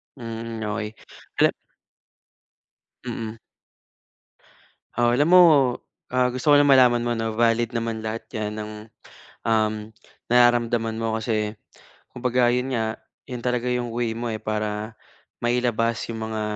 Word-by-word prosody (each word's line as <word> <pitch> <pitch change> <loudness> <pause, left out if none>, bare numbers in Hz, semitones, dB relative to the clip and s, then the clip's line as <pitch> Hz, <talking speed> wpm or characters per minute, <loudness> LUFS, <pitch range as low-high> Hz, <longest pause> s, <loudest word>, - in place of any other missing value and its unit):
Hmm, 115 -2 -6
okey. 105 +1 -3 0.4
Gan - - +5 1.5
Mm. 110 0 -5 1.6
Oo, 120 0 +3
alam 145 +6 +3
mo, 180 +1 +8 0.9
gusto 130 +4 -6
ko - - +8
lang 145 0 +5
malaman 125 -3 +5
mo 120 - -1
na 115 -1 -2
valid 115 +1 +1
naman 115 -1 -2
lahat 110 +1 -4
'yan 105 -1 -3
ang, 110 0 -6 0.7
um, 110 -1 +2 0.6
nararamdaman 120 -2 +3
mo. 110 0 -1
Kasi 110 -1 -2 0.5
kumbaga 125 -1 +1
'yun 125 +1 -1
nga, 110 -1 -2 0.3
'yun 125 - -4
talaga 125 0 0
'yung 120 -2 -2
way 120 -1 -1
mo 120 - -3
eh 110 - -6
para 110 0 -3 0.4
mailabas 120 -1 0
'yung 110 -1 -4
mga, 110 -1 -3
115 Hz, 125 wpm, -24 LUFS, 110-120 Hz, 1.6 s, mo